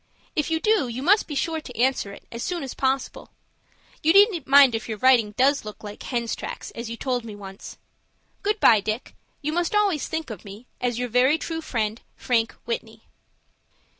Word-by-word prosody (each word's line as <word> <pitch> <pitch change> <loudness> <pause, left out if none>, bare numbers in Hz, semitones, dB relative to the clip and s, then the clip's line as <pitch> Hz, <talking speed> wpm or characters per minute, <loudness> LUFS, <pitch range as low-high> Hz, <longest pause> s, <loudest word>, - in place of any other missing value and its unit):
If 300 0 0
you 320 0 +1
do, 425 - +2
you 240 +2 -5
must 405 +7 +4
be 295 - -5
sure 320 +3 -1
to 250 -6 -11
answer 255 -5 +1
it, - - -12
as 235 - -6
soon 350 +2 -2
as 265 - -5
possible. 265 0 -2 0.7
You 320 +1 +4
needn't 395 - +5
mind 275 -2 +7
if 225 0 -4
your 220 - -3
writing 235 -3 +4
does 275 +5 +3
look 210 0 -9
like 205 0 -8
'hens 235 -3 -2
tracks,' - - -7
as 235 0 -6
you 230 - -5
told 250 -2 -1
me 220 -2 -8
once. 195 -1 -10 0.6
"Good 420 +1 0
by, 220 - +6
Dick. 215 +4 -4 0.3
You 305 +2 -1
must 350 +3 0
always 400 -8 +2
think 320 -5 -4
of 215 - -8
me, 205 +3 -11 0.2
as 245 -2 0
your 250 0 -1
very 250 +6 +3
true 325 0 -4
friend, 220 -6 -2
"FRANK 230 -2 0
WHITNEY." 470 +1 -5
255 Hz, 195 wpm, -24 LUFS, 230-320 Hz, 0.7 s, mind